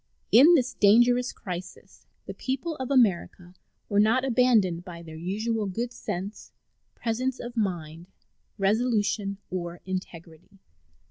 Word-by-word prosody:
In 295 Hz, +9 st, +8 dB
this 260 Hz, -4 st, +1 dB
dangerous 240 Hz, +4 st, +4 dB
crisis 180 Hz, -1 st, -9 dB, 0.2 s
the -, -, -6 dB
people 275 Hz, +5 st, -3 dB
of 260 Hz, -1 st, -5 dB
America 190 Hz, -8 st, +1 dB, 0.3 s
were 200 Hz, -, +1 dB
not 225 Hz, +5 st, +3 dB
abandoned 225 Hz, -9 st, +2 dB
by 170 Hz, -2 st, -10 dB
their 160 Hz, -1 st, -10 dB
usual 210 Hz, +6 st, -2 dB
good 235 Hz, +6 st, -4 dB
sense, 200 Hz, +1 st, -6 dB, 0.4 s
presence 250 Hz, +3 st, -2 dB
of 240 Hz, 0 st, -7 dB
mind, 170 Hz, -6 st, -3 dB, 0.5 s
resolution, 205 Hz, -1 st, 0 dB
or 175 Hz, -1 st, -4 dB
integrity. 175 Hz, -1 st, -8 dB
210 Hz, 120 wpm, -26 LUFS, 180-245 Hz, 0.5 s, In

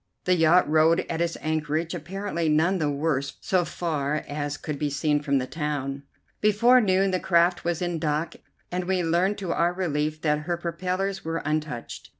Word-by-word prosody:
The 180 Hz, -, +3 dB
yacht 165 Hz, 0 st, +4 dB
rode 160 Hz, +2 st, +3 dB
at 165 Hz, 0 st, -2 dB
its 170 Hz, -1 st, -1 dB
anchorage, 155 Hz, +1 st, -1 dB
apparently 175 Hz, 0 st, -3 dB
none 170 Hz, +5 st, +2 dB
the 150 Hz, -2 st, +1 dB
worse 140 Hz, -1 st, -1 dB
so 185 Hz, -2 st, +1 dB
far 155 Hz, -3 st, -2 dB
as 145 Hz, 0 st, -3 dB
could 150 Hz, -2 st, -5 dB
be 150 Hz, -, 0 dB
seen 145 Hz, +1 st, 0 dB
from 140 Hz, -2 st, +1 dB
the 130 Hz, -, -1 dB
town. 140 Hz, -2 st, -3 dB, 0.4 s
Before 235 Hz, +5 st, +5 dB
noon 190 Hz, -2 st, +2 dB
the 185 Hz, -, 0 dB
craft 175 Hz, 0 st, +2 dB
was 170 Hz, 0 st, -1 dB
in 175 Hz, -2 st, -2 dB
dock, 155 Hz, +1 st, -1 dB, 0.4 s
and 180 Hz, 0 st, -2 dB
we 185 Hz, -1 st, 0 dB
learned 175 Hz, +5 st, +1 dB
to 190 Hz, -4 st, -3 dB
our 175 Hz, +1 st, +1 dB
relief 155 Hz, -4 st, -1 dB
that 150 Hz, -1 st, +2 dB
her 175 Hz, -, +1 dB
propellers 185 Hz, +3 st, -2 dB
were 165 Hz, 0 st, -3 dB
untouched. 155 Hz, -5 st, -3 dB
165 Hz, 180 wpm, -25 LUFS, 150-180 Hz, 0.4 s, Before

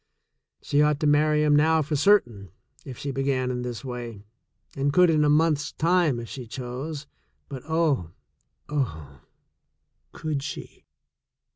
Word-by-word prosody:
She 145 Hz, -, +2 dB
ought 150 Hz, -1 st, +2 dB
to -, -, +1 dB
marry 150 Hz, +1 st, +3 dB
him 150 Hz, -1 st, +4 dB
now 160 Hz, +1 st, +3 dB
for 150 Hz, +1 st, -2 dB
certain, 120 Hz, -, +2 dB, 0.3 s
if 130 Hz, -3 st, -9 dB
she 140 Hz, -, -4 dB
began 135 Hz, -1 st, -1 dB
in 125 Hz, 0 st, -3 dB
this 125 Hz, +1 st, -6 dB
way, 120 Hz, -5 st, -6 dB, 0.5 s
and 140 Hz, +1 st, 0 dB
could 180 Hz, +2 st, +5 dB
in 155 Hz, -1 st, +3 dB
a 150 Hz, -, +3 dB
month's 150 Hz, -1 st, +2 dB
time 165 Hz, -6 st, +2 dB
if 115 Hz, -, -7 dB
she 125 Hz, -1 st, -8 dB
chose, 135 Hz, +5 st, -6 dB, 0.4 s
but 135 Hz, -3 st, -7 dB
oh, 155 Hz, -, +1 dB, 0.6 s
oh 80 Hz, -, -4 dB, 0.4 s
— -, -, -50 dB
could 155 Hz, -3 st, -3 dB
she? 140 Hz, 0 st, -8 dB
145 Hz, 150 wpm, -25 LUFS, 125-150 Hz, 0.6 s, could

